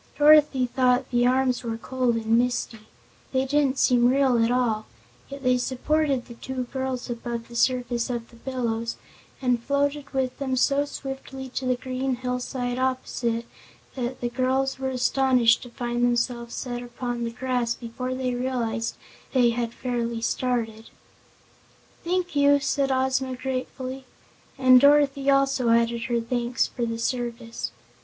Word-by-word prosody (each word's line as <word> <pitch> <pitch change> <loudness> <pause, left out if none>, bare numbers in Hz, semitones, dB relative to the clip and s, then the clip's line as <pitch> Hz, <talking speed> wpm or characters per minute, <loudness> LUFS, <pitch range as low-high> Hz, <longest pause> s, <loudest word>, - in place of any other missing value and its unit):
Dorothy 295 -3 +6
thought 250 +1 +2
the 245 0 +3
arms 255 -1 +2
were 225 -1 -3
cold 250 0 0
and 225 0 +1
misty 235 -2 -1 0.5
they 260 0 +2
didn't 280 -1 +1
seem 245 -2 +4
real 260 -3 +3
at 230 - +2
all 235 -3 0 0.4
yet 275 0 -8
they 250 0 +3
supported 270 +1 0
the 235 - -10
two 255 +2 -4
girls 260 -2 -3
above 235 -1 -5
the 235 - -12
surface 245 -1 +1
of 235 -2 -4
the - - -16
billows 230 -2 -3 0.5
and 245 -2 +2
floated 280 +2 -1
with 260 -2 -2
them 265 -2 -1
so 280 +2 +2
swiftly 270 -1 -7
to 255 +1 -4
the 255 - +2
green 255 +1 -2
hillside 250 0 -3
opposite 250 -3 -1 0.5
that 255 0 -4
the 240 - -1
girls 265 +2 0
were 265 0 -1
astonished 255 -2 +3
to 245 - -9
find 240 0 -2
themselves 240 0 0
set 245 -2 -4
upon 245 0 -4
the 230 - -1
grass 245 -1 -1
before 250 +2 -5
they 255 -1 -1
realized 240 -3 -2 0.4
they 245 -3 +4
had 235 -1 -2
fairly 235 -2 -2
started. 225 -1 -2 1.1
"Thank 355 -2 -1
you!" 285 0 +5
said 275 -1 0
Ozma 260 0 0
gratefully, 260 0 -4 0.5
and 255 -2 +7
Dorothy 280 -1 +4
also 275 -3 +3
added 235 0 +2
her 240 -2 0
thanks 240 +1 0
for 240 -1 -3
the 230 0 -3
service. 235 -1 -3
250 Hz, 150 wpm, -25 LUFS, 235-265 Hz, 1.1 s, and